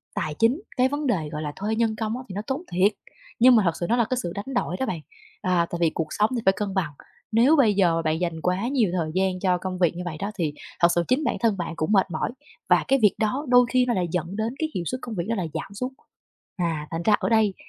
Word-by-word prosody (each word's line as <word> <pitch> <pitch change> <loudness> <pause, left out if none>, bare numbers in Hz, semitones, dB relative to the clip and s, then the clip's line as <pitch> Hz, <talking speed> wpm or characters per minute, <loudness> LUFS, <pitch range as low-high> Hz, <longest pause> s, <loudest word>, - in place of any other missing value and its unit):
tài 155 - -2
chính, 240 +9 +3 0.2
cái 255 0 +4
vấn 290 +1 -2
đề, 170 -11 0
gọi 150 -1 -4
là, 150 -1 -3
thuê 210 +3 -2
nhân 225 -1 +1
công 220 +1 -2
á, 255 - -7
thì - - -6
nó 205 - -2
tốn 270 +3 -2
thiệt. 185 +4 +3 0.5
Nhưng 250 +1 +7
mà 220 - +5
thật 170 - +3
sự 175 - -1
nó 235 - +4
là 235 - +3
cái 255 - 0
sự 175 - -3
đánh 205 +7 -5
đổi 180 -7 0
đó 265 - 0
bạn. 170 -9 -3 0.4
À, 180 -2 +2
tại 170 - -3
vì 165 - +4
cuộc 160 - -2
sống 210 +1 +2
thì 235 - -1
phải 190 - +6
cân 205 -2 -2
bằng, 185 -6 -1 0.4
nếu 240 +8 +5
bây 245 -8 +4
giờ 175 -4 +2
bạn 160 0 0
dành 170 -2 -2
quá 180 +6 0
nhiều 245 -8 +1
thời 160 -2 -1
gian 190 -1 +1
cho 180 -1 +2
công 185 0 -5
việc 175 -2 +2
như 175 - -5
vậy 165 -3 -4
đó, 200 +2 -3
thì 160 -6 -1 0.3
thật 170 - +7
sự 175 - +2
chính 260 +5 +2
bản - - 0
thân 225 -4 +2
bạn 170 -2 -3
cũng 155 +5 -1
mệt 195 -3 +3
mỏi, 155 +7 -2 0.4
và - - +4
cái 270 0 +3
việc 210 - +5
đó 255 +7 0
đôi 245 0 +6
khi 255 0 +3
nó 245 - +1
lại 180 -4 0
dẫn 175 +2 -2
đến 220 +3 -2
cái 315 - -1
hiệu 180 - -1
suất 255 +1 -3
công 235 -3 -6
việc 170 -3 -2
đó 230 - +1
là 185 -5 -2
giảm 200 - -5
xuống. 250 +6 -4 0.6
À, 165 -4 -2
thành 165 0 -3
ra 210 +3 +4
ở - - -1
đây 220 -3 +3
200 Hz, 290 wpm, -25 LUFS, 175-235 Hz, 0.6 s, Nhưng